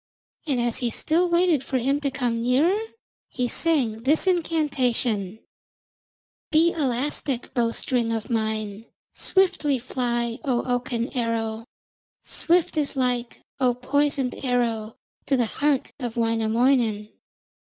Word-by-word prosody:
And 270 -4 +1
as 240 -1 0
he 245 - 0
still 335 +9 +1
waited 345 -5 +3
for 265 - -1
him 270 +4 +1
to 285 -1 -1
come 240 -3 -1
nearer, 295 - +2 0.5
he 250 -1 -1
sang 245 -7 +1
this 295 +8 +2
incantation: 255 - 0 1.1
'Be 330 +1 +4
elastic, 270 -2 -2
bow 240 -3 +2
string 230 -3 0
mine, 220 -2 -2 0.3
swiftly 365 -7 +2
fly, 240 -1 -2
O 250 -5 0
oaken 245 0 -2
arrow, 225 -2 -2 0.6
swift 340 0 +2
as 290 -1 -2
light, 250 -2 -1 0.2
O 250 -2 +2
poisoned 275 +1 0
arrow, 230 -4 -1 0.3
to 275 - +2
the 240 - +2
heart 280 +4 0
of 240 -3 -5
Wainamoinen. 225 -1 +1
250 Hz, 120 wpm, -24 LUFS, 230-290 Hz, 1.1 s, Be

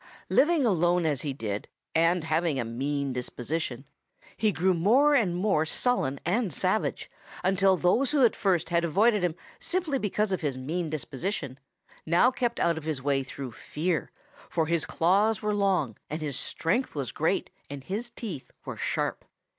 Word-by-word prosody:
"Living 310 -2 +4
alone 175 -4 +2
as 145 -5 +1
he 145 - -2
did, 105 -6 -4 0.3
and 165 +1 +3
having 160 -2 0
a 120 - -1
mean 140 +4 -2
disposition, 125 +2 -4 0.5
he 215 -2 +2
grew 185 +1 +2
more 240 - +4
and 210 -11 +3
more 180 -4 +2
sullen 160 - 0
and 200 +3 +1
savage - - -1 0.4
until 190 0 +3
those 205 +11 +3
who 285 -4 +4
at 230 - +2
first 185 -6 +1
had 170 -1 +2
avoided 205 +5 +3
him 175 -3 0 0.2
simply 330 -5 -1
because 210 -1 0
of 190 - -1
his 140 -5 -1
mean 160 +6 -3
disposition 150 - -4 0.4
now 175 +10 +4
kept 245 -2 -1
out 170 -1 +2
of - - -13
his 155 -3 -2
way 135 0 +1
through 135 -1 -7
fear, 155 - -2 0.4
for 160 - +1
his 165 0 +1
claws 200 +6 +2
were 210 0 +1
long 190 - +1
and 155 +1 -4
his 145 -3 -3
strength 170 - -1
was 135 -4 -3
great - - 0 0.2
and 140 -1 -7
his 215 - -4
teeth 195 - -7
were - - -6
sharp. - - -2
170 Hz, 170 wpm, -28 LUFS, 145-210 Hz, 0.5 s, Living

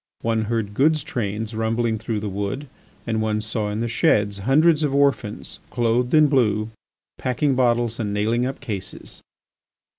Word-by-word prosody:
One 115 -1 +1
heard 110 -2 -2
goods 155 +5 +3
trains 110 0 -3
rumbling 110 0 0
through 110 -1 -3
the 105 - -3
Wood 100 +8 -3 0.4
and 110 -2 -1
one 110 -1 0
saw 110 0 -3
in 105 +2 -3
the 120 - 0
sheds 105 -3 +2
hundreds 150 - +4
of 145 -3 0
orphans 140 -7 0
clothed 120 +2 +1
in 155 0 +7
blue, 110 -6 +1 0.5
packing 135 +3 +1
bottles 120 -2 +1
and 105 -3 -2
nailing 110 +4 +1
up 135 - -5
cases. 100 -3 -7
115 Hz, 155 wpm, -23 LUFS, 105-125 Hz, 0.5 s, in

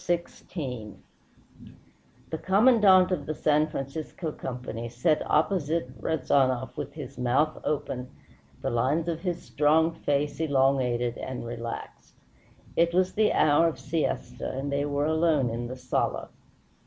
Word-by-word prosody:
XVI 135 - -4 1.4
The 160 - -3
Commandante 195 -3 +5
of 155 -6 -3
the 155 - -2
San 150 +1 +2
Francisco 155 +3 -5
Company 125 -4 -6
sat 125 +7 +1
opposite 155 -4 +1
Rezanov 130 -4 +1
with 145 -2 -5
his 145 -5 -8
mouth 135 +6 +1
open, 130 -4 -2 0.5
the - - 0
lines 135 +8 +1
of 165 -2 -1
his 175 -2 -3
strong 155 +3 +3
face 145 -2 -1
elongated 130 -5 +1
and 130 -2 -5
relaxed. 115 0 -7 0.6
It 170 +1 +2
was 185 0 +2
the 215 0 +3
hour 155 +2 +4
of 165 - -2
siesta, 155 +1 -2
and 140 +1 -3
they 140 +1 0
were 145 0 0
alone 160 -5 +2
in 120 +1 -3
the 130 - -6
sala. 125 -1 -1
145 Hz, 130 wpm, -27 LUFS, 130-165 Hz, 1.4 s, Commandante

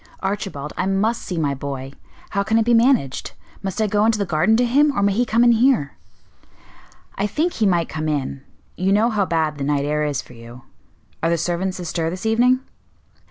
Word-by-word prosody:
"Archibald, 195 -7 -4
I - - -1
must 210 +4 0
see 180 - -5
my 145 -3 0
boy; 135 -1 -6 0.4
how 200 - 0
can 220 +3 +1
it 225 - +2
be 240 - +3
managed? 230 - +2 0.3
Must 195 0 -4
I 220 - +2
go 210 0 +1
into 225 0 +3
the 200 - -1
garden 175 +6 +2
to 245 - +3
him, 285 +5 +3
or 200 - +2
may 200 - +3
he 240 +4 +1
come 230 +2 +3
in 240 - +6
here?" 230 - +3 1.3
"I 200 - +1
think 320 - -1
he 215 - +1
might 175 -3 +1
come 155 0 -3
in; 140 -2 -2 0.3
you 185 +2 0
know 220 +4 +3
how 205 -3 +1
bad 160 -3 -1
the - - -2
night 140 0 0
air 150 +1 0
is 145 -2 -1
for - - -10
you. 120 +1 -12 0.6
Are 165 - +1
the 170 - +2
servants 175 +3 -2
astir 165 -1 -2
this 185 +4 -6
evening?" 245 +3 +3
190 Hz, 210 wpm, -21 LUFS, 150-225 Hz, 1.3 s, in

